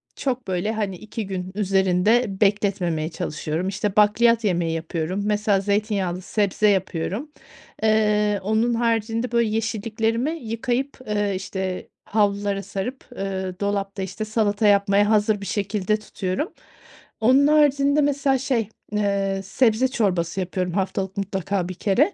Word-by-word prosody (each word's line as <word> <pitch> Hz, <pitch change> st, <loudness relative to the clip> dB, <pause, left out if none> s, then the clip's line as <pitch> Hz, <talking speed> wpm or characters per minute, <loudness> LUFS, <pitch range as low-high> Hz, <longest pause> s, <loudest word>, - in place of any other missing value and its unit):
çok 255 Hz, -5 st, -2 dB
böyle 185 Hz, +3 st, -1 dB
hani 205 Hz, -3 st, -2 dB
2 215 Hz, +2 st, -6 dB
gün 185 Hz, -1 st, -4 dB
üzerinde 195 Hz, +2 st, +2 dB
bekletmemeye 195 Hz, -6 st, +1 dB
çalışıyorum. 165 Hz, 0 st, -3 dB
İşte 195 Hz, +1 st, -2 dB
bakliyat 230 Hz, +2 st, +4 dB
yemeği 175 Hz, -5 st, +1 dB
yapıyorum. 165 Hz, +3 st, -3 dB
Mesela 210 Hz, -1 st, +2 dB
zeytinyağlı 200 Hz, -3 st, -1 dB
sebze 210 Hz, +1 st, +1 dB
yapıyorum. 195 Hz, -, -1 dB, 0.5 s
Eee, 210 Hz, -1 st, +3 dB
onun 220 Hz, +4 st, +1 dB
haricinde 230 Hz, 0 st, 0 dB
böyle 235 Hz, -2 st, +2 dB
yeşilliklerimi 225 Hz, +4 st, -1 dB
yıkayıp, 250 Hz, -1 st, -2 dB
eee, 205 Hz, -2 st, 0 dB
işte, 190 Hz, -1 st, -4 dB, 0.2 s
havlulara 200 Hz, -1 st, 0 dB
sarıp, 245 Hz, +9 st, -5 dB
eee, 190 Hz, -1 st, -4 dB
dolapta 200 Hz, -1 st, -2 dB
işte 195 Hz, +3 st, -4 dB
salata 215 Hz, -1 st, +1 dB
yapmaya 200 Hz, 0 st, +4 dB
hazır 210 Hz, -1 st, +2 dB
bir -, -, -5 dB
şekilde 205 Hz, 0 st, 0 dB
tutuyorum. 205 Hz, -, -3 dB, 0.7 s
Onun 260 Hz, +5 st, +5 dB
haricinde 290 Hz, -1 st, +4 dB
mesela 280 Hz, -1 st, +2 dB
şey, 245 Hz, -5 st, -1 dB, 0.2 s
eee, 200 Hz, -2 st, 0 dB
sebze 225 Hz, +4 st, +2 dB
çorbası 185 Hz, -7 st, 0 dB
yapıyorum 180 Hz, 0 st, -2 dB
haftalık 190 Hz, 0 st, -2 dB
mutlaka 195 Hz, -1 st, -2 dB
1 185 Hz, -, -4 dB
kere. 230 Hz, -, +2 dB
205 Hz, 125 wpm, -23 LUFS, 190-225 Hz, 0.7 s, Onun